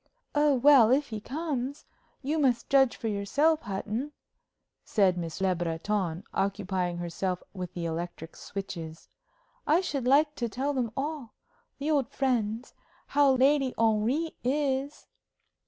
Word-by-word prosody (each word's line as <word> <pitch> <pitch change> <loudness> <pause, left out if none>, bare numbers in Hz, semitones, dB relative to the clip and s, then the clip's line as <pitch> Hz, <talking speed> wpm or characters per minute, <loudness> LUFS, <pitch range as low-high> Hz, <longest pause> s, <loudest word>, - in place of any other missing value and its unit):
"Oh, 295 -1 +4
well, 260 -3 +7
if 280 +2 +2
he 220 -2 -4
comes 280 0 -4 0.4
you 305 +4 0
must 255 -4 +1
judge 270 -3 +5
for 225 - -4
yourself, 285 +10 +1
Hutton," 215 +8 -4 0.7
said 195 -4 +2
Miss 165 -1 -5
Le 190 -1 +2
Breton, 175 +1 -2
occupying 190 -3 -1
herself 175 +1 -3
with 180 -2 -5
the 170 -1 -3
electric 165 0 -5
switches. 165 -5 -7 0.6
"I 315 +4 +5
should 280 -9 -2
like 295 +3 +4
to 235 -1 -2
tell 270 +6 -2
them 245 -5 -1
all 285 -4 -4 0.4
the 290 +3 -1
old 280 -5 +1
friends 240 -3 -1 0.3
how 280 -1 +4
Lady 270 0 +3
Henry 230 +9 +1
is." 275 +1 -1
240 Hz, 135 wpm, -28 LUFS, 195-285 Hz, 0.7 s, well